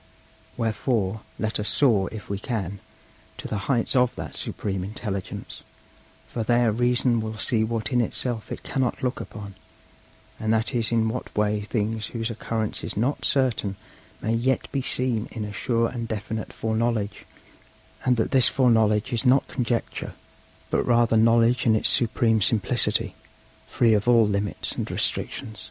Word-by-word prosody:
Wherefore 110 -2 -1 0.2
let 110 0 -1
us 105 - -1
soar, 110 -9 +3
if 110 -2 -8
we 100 -1 -3
can, 100 -5 -4 0.6
to - - -6
the 100 +2 -4
heights 120 -2 +1
of 125 -1 +3
that - - -7
Supreme 95 -3 -3
Intelligence; 100 -1 -5 0.7
for 120 - -4
there 120 0 +3
Reason 120 +1 +2
will 110 0 -5
see 110 +1 +2
what 110 -1 -2
in 125 -1 +3
itself 115 0 -2
it - - -6
cannot 130 -3 -2
look 125 -1 -1
upon; 100 -2 -8 0.9
and 110 0 -1
that 110 0 +1
is 115 -2 0
in 115 -1 +2
what 125 +3 -5
way 105 0 +1
things 110 0 -2
whose 115 0 -3
occurrence 110 -1 -3
is - - -5
not 125 +7 0
certain 125 -7 +1 0.5
may 110 - 0
yet 130 +3 0
be 140 - -1
seen 125 -3 0
in 110 -3 -5
a 105 - -7
sure 115 +2 0
and 115 -2 -5
definite 110 0 -4
foreknowledge; 110 -2 -2 0.8
and 125 -2 +2
that 110 - 0
this 130 -2 +7
foreknowledge 110 -4 +2
is 115 - 0
not 130 +1 +4
conjecture, 120 -2 -3 0.6
but - - +2
rather 120 -2 +3
knowledge 115 +2 +4
in 110 - +5
its 110 - +4
supreme 115 -1 +3
simplicity, 110 -1 +3 0.5
free 115 -2 +3
of 105 +1 +1
all 120 -2 +6
limits 100 0 -2
and - - -4
restrictions.' 110 -3 -3
115 Hz, 160 wpm, -25 LUFS, 105-120 Hz, 0.9 s, this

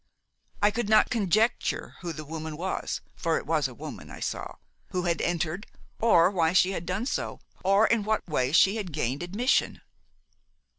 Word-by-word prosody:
I 205 - +6
could 230 -1 -2
not 215 +2 +5
conjecture 220 0 +1
who 175 -2 -4
the 155 -1 -7
woman 160 0 -6
was 185 +3 -3
for - - 0
it - - -5
was - - +1
a - - -10
woman - - -8
I - - -9
saw - - -4 0.3
who 180 -2 -2
had 170 -1 0
entered, 175 +3 -1 0.3
or 185 -6 +5
why 170 -4 +2
she 185 0 +4
had 175 -3 -5
done 190 +6 -1
so, - - -3 0.2
or 195 +3 +5
in 230 -1 +2
what 215 0 -1
way 130 -5 0
she 190 +6 +5
had 190 -7 -5
gained 140 -1 -1
admission. 205 +9 0
185 Hz, 180 wpm, -27 LUFS, 165-210 Hz, 0.3 s, I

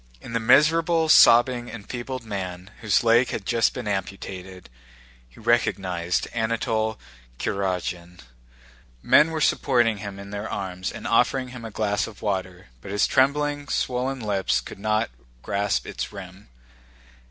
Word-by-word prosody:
In 115 - -10
the 115 - +1
miserable, 160 +7 +4
sobbing, 120 -3 +6
enfeebled 120 +3 -6
man 95 -2 -6
whose 105 -1 +2
leg 120 +2 +4
had 100 - -4
just 115 +4 +1
been 125 -4 -5
amputated, 95 -2 -5 0.6
he - - -18
recognized 95 -7 0
Anatole 110 -1 -1 0.4
Kurágin. 90 -1 -3 0.8
Men 155 - +5
were 160 -1 -3
supporting 120 -7 +2
him 100 -1 -7
in 100 0 -10
their 105 +1 -5
arms 95 -2 -4
and - - -9
offering 125 +2 +2
him 125 -1 -9
a 115 - -6
glass 105 -1 -1
of 110 - -12
water, 95 - -3
but - - -10
his 105 +1 +2
trembling, 145 +2 +1
swollen 130 +1 -1
lips 100 -4 0
could - - -10
not 110 - 0 0.3
grasp 100 -10 -1
its - - -5
rim. 95 0 -11
110 Hz, 140 wpm, -24 LUFS, 95-125 Hz, 0.8 s, sobbing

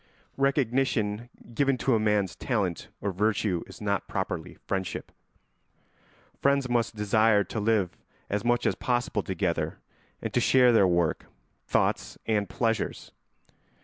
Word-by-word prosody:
Recognition 125 -5 +1 0.2
given 135 +2 +2
to 130 +2 +1
a 110 - +3
man's 105 -3 +1
talent 100 - -2
or 100 - -1
virtue 100 -2 0
is - - -12
not 100 -2 -1
properly 90 -4 -3
friendship. 95 -2 -3 1.3
Friends 140 -1 +3
must 115 -2 0
desire 105 0 +3
to 110 - -5
live 105 -4 +1 0.3
as 105 0 -1
much 120 0 +1
as - - +3
possible 120 -3 -1
together 85 -4 -2 0.4
and - - -5
to - - +3
share 125 -2 +5
their 105 -5 +5
work, 85 -2 +1 0.4
thoughts, - - 0
and 105 -2 0
pleasures. 115 -2 -1
110 Hz, 130 wpm, -27 LUFS, 100-120 Hz, 1.3 s, share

